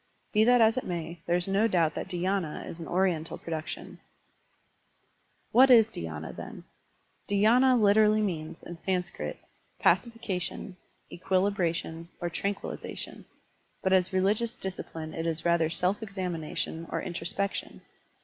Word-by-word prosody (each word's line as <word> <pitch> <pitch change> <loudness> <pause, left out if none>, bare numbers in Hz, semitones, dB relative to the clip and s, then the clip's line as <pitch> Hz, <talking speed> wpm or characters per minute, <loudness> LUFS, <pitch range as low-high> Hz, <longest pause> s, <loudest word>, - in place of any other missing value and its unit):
Be 215 0 +5
that 245 0 +6
as 225 +2 +5
it 255 - 0
may, 170 -1 -5
there 175 - +3
is 175 +1 0
no 200 +3 +3
doubt 170 -7 +2
that - - -4
dhy^na 185 -2 -2
is 165 - -8
an 165 - -6
Oriental 175 -3 0
production 160 -1 -6 1.5
What 260 +2 +7
is 225 -3 +7
dhySna, 80 -1 -5
then? - - -8 0.7
Dhy^na 240 +5 +5
literally 215 +1 +5
means, 160 -6 -3
in 175 - -8
Sanskrit, 175 - -3 0.4
pacification, 195 -2 0 0.4
equilibration, 175 -3 -1
or 175 -1 -3
tran 200 +4 -1
quillization, - - -7 0.6
but 190 - +2
as 185 -1 +3
religious 205 +5 +1
discipline 165 -4 -5
it 165 0 -3
is 165 0 -1
rather 170 -2 +3
self 180 +6 0
examination 175 -5 -4
or - - -2
introspection. 185 +2 -3
185 Hz, 130 wpm, -29 LUFS, 165-205 Hz, 1.5 s, What